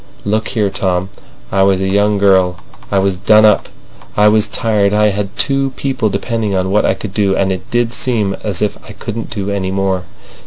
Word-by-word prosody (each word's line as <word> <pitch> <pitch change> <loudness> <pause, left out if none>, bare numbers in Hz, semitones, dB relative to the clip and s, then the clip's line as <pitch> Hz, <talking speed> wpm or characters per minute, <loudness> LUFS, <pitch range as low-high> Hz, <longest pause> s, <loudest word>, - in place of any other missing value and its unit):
"Look 110 +2 0
here, 105 -4 0
Tom! 95 -1 -1 0.4
I 95 - +2
was 95 -1 +3
a 95 - -1
young 100 +2 +2
girl. 95 -3 +3 0.3
I 100 - +2
was 95 -1 +1
done 110 +3 +5
up. 105 -2 +3 0.5
I 105 0 +6
was 110 0 +3
tired. 105 -3 +1
I 105 0 +4
had 100 0 -4
two 135 -1 +1
people 130 -5 -1
depending 110 -2 -2
on 95 0 0
what 105 - +2
I - - +1
could 95 0 -7
do, 100 -2 +1
and 95 -1 +1
it 95 -1 -5
did 120 0 0
seem 110 -7 0
as 105 -2 -1
if 105 - -2
I 105 - -11
couldn't 115 +2 -6
do 100 -2 -3
any 95 -2 -2
more. 95 -1 -1
100 Hz, 205 wpm, -15 LUFS, 95-110 Hz, 0.5 s, I